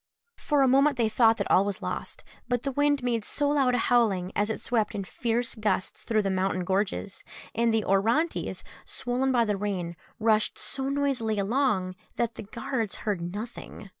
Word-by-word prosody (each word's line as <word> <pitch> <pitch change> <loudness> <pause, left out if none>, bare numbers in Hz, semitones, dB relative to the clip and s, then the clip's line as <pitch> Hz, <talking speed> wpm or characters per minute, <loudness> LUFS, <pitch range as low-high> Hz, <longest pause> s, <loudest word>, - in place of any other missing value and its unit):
For 290 -2 +2
a - - +4
moment 275 +2 +4
they 230 -2 +2
thought 225 0 +4
that - - -2
all 190 - +6
was 200 -1 -3
lost; - - -5 0.2
but 245 -1 0
the 275 - -1
wind 290 0 +2
made 235 -3 0
so 290 +6 -1
loud 270 -4 +3
a - - +2
howling 220 -7 +2
as 210 +1 +1
it 220 - -2
swept 220 -3 0
in 200 - -2
fierce 235 +4 -1
gusts 210 -4 -1
through 215 -2 +1
the 195 - 0
mountain 185 -1 0
gorges 195 +1 -2 0.3
and 230 0 +2
the 220 -2 +1
Orontes, 230 - +1 0.2
swollen 255 +2 -1
by 240 -2 +3
the 210 -2 0
rain, 185 -4 -3 0.2
rushed 215 -1 +2
so 270 0 -3
noisily 270 -6 0
along 200 -3 +1 0.2
that 235 -1 0
the - - -8
guards 230 0 -3
heard 205 -5 0
nothing. 205 +3 -7
225 Hz, 185 wpm, -27 LUFS, 200-250 Hz, 0.3 s, all